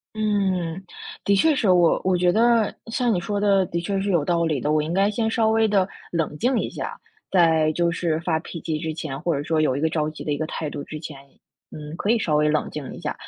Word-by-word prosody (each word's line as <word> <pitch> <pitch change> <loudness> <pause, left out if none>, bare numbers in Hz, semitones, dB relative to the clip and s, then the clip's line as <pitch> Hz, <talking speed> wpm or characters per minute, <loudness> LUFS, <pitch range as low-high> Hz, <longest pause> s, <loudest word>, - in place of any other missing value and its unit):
嗯， 190 -5 -1 0.4
的 200 - +3
确 305 +9 +4
是， 220 -6 +1
我 175 -2 +4
我 185 -1 +2
觉 175 0 +3
得 230 0 +3
像 235 0 0
你 180 - +1
说 205 +3 -2
的， 200 -2 +3
的 170 - -2
确 195 +2 -2
是 200 - -2
有 170 -6 +2
道 170 0 +1
理 155 -4 0
的。 145 +4 -1
我 155 0 +3
应 160 +3 -3
该 200 +2 +2
先 220 +1 0
稍 225 -1 +2
微 220 0 +3
的 195 -2 +2 0.2
冷 165 -3 -1
静 250 +1 +2
一 - - -2
下， - - -6 0.3
在 160 -4 +4
就 170 0 +1
是 170 -2 -1
发 165 -2 0
脾 165 +1 -8
气 155 -2 -2
之 160 0 -3
前， 145 -4 -5
或 170 -2 0
者 140 - -2
说 155 0 +1
有 130 -4 +1
一 140 - -2
个 160 - +2
着 155 -1 -1
急 155 - -9
的 150 - -3
一 145 - 0
个 155 - -2
态 155 -3 -4
度 145 -1 -6
之 155 - -7
前。 145 -2 -8 0.5
嗯， 150 0 -9
可 205 - -2
以 235 - +4
稍 155 -8 +1
微 150 0 +3
冷 155 0 0
静 150 -3 -7
一 - - -10
下， - - -2
170 Hz, 280 characters per minute, -23 LUFS, 155-200 Hz, 0.5 s, 确